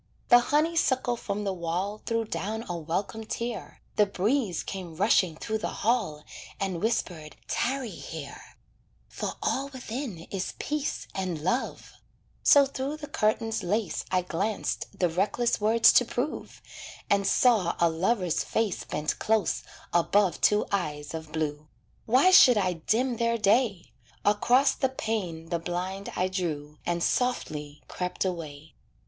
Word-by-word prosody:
The 240 - +9
honeysuckle 290 -3 +1
from 210 -2 -4
the 195 -1 -1
wall 185 +4 -3
Threw 230 -1 0
down 215 +5 -4
a 175 - -3
welcome 175 +7 -3
tear, 235 +2 -5 0.2
The 210 - +5
breeze 205 +1 0
came 180 -4 -6
rushing 185 -3 +3
through 220 +6 -3
the - - -5
hall 210 -11 +1 0.4
And 190 -4 -2
whispered, 175 -8 -2
"Tarry 255 -2 -1
here, - - -9 0.5
"For - - -4
all 275 +1 0
within 255 - -6
is 190 -2 -3
peace 295 -1 -2
and 185 -4 -2
love;" 210 +10 -2 0.5
So 285 -1 +7
through 275 +2 -4
the 305 - -7
curtain's 220 -1 0
lace 205 +1 -1
I 185 -1 +1
glanced 195 +4 -2
the 180 - +3
reckless 205 +8 0
words 220 +2 +6
to - - +6
prove, 250 +6 -4 0.4
And 200 -1 +2
saw 215 -9 +3
a 170 - +5
lover's 180 +1 0
face 220 -4 -1
Bent 150 - -2
close 220 -1 +1 0.3
above 180 +1 +2
two 210 0 +4
eyes 150 -7 -2
of 160 -1 -6
blue. 155 -1 -3 0.4
Why 260 +11 +5
should 250 -10 +8
I 185 -3 +1
dim 230 +9 0
their 235 0 +1
day? 210 - +2 0.3
Across 245 +7 +3
the 265 - +3
pane 190 -10 -3
the 170 - 0
blind 180 +3 -4
I 185 - +1
drew, 155 -5 -4
And 170 -1 0
softly 150 - -1
crept 180 +1 -3
away. 160 -4 -5
200 Hz, 140 wpm, -27 LUFS, 170-235 Hz, 0.5 s, The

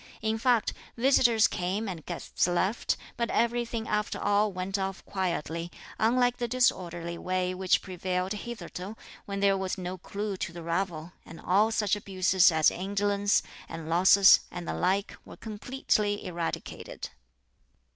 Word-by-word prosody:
In 220 0 0
fact, 240 -1 +2 0.2
visitors 235 -3 +4
came 190 +5 -2
and 175 -5 -6
guests 175 +1 -1
left, 185 +5 0 0.2
but 235 -1 -1
everything 235 -1 0
after 210 0 -1
all 205 +1 +2
went 190 +2 -3
off 190 0 -4
quietly, 170 -3 -2 0.3
unlike 245 +2 +3
the 240 - -2
disorderly 175 -9 0
way 185 0 -1
which 185 0 +1
prevailed 185 0 -2
hitherto, 205 -2 -7 0.3
when 200 0 -4
there 200 -1 +4
was 190 0 -2
no 185 0 -5
clue 200 +2 -4
to 190 -1 -3
the 170 0 -9
ravel; 170 -1 -2
and 165 - -12
all 205 +4 +3
such 210 -3 +1
abuses 190 -2 +3
as 160 -1 +4
indolence, 200 +2 +1 0.3
and 165 -1 -7
losses, 190 +3 +7
and 175 -1 -7
the - - -2
like 190 +3 0
were - - -12
completely 210 -2 -1
eradicated. 170 -2 -5
195 Hz, 145 wpm, -28 LUFS, 180-215 Hz, 0.3 s, losses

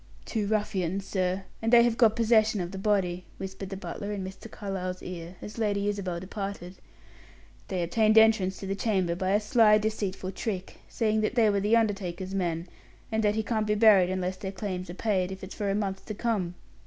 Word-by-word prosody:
"Two 215 -3 -2
ruffians, 195 -3 -1
sir, 185 0 -1 0.2
and 225 +1 0
they 235 -1 +8
have 235 -1 +2
got 225 -3 +4
possession 220 -2 +3
of 175 -1 -3
the 190 - -6
body," 190 -3 0
whispered 190 0 -6
the 195 - -5
butler 200 +1 -5
in 200 -2 -3
Mr. 190 +4 -8
Carlyle's 185 -3 -5
ear, 175 0 -7
as 210 +2 -8
Lady 205 -2 0
Isabel 190 -4 -2
departed. 195 -1 -6 0.9
"They 185 -2 -1
obtained 215 +5 +3
entrance 220 -4 +5
to - - -7
the 195 - -1
chamber 190 -4 0
by 185 +2 -1
a 205 - +4
sly, 210 0 +5
deceitful 205 -3 -2
trick, 190 -1 -4
saying 220 -2 +1
they 220 0 +3
were 200 - +1
the 210 +4 +3
undertaker's 195 -4 -1
men, 175 -3 -1 0.4
and 220 0 +1
that 210 0 +2
he 220 - 0
can't 215 0 -1
be 210 - +2
buried 205 -4 +6
unless 185 0 -2
their 190 0 -5
claims 185 -2 -5
are 175 - -6
paid, 190 -3 0
if 190 0 -8
it's 190 - -7
for 205 -1 -2
a 195 - +1
month 195 -2 -2
to 215 - -4
come. 200 -6 -1
200 Hz, 205 wpm, -28 LUFS, 185-215 Hz, 0.9 s, they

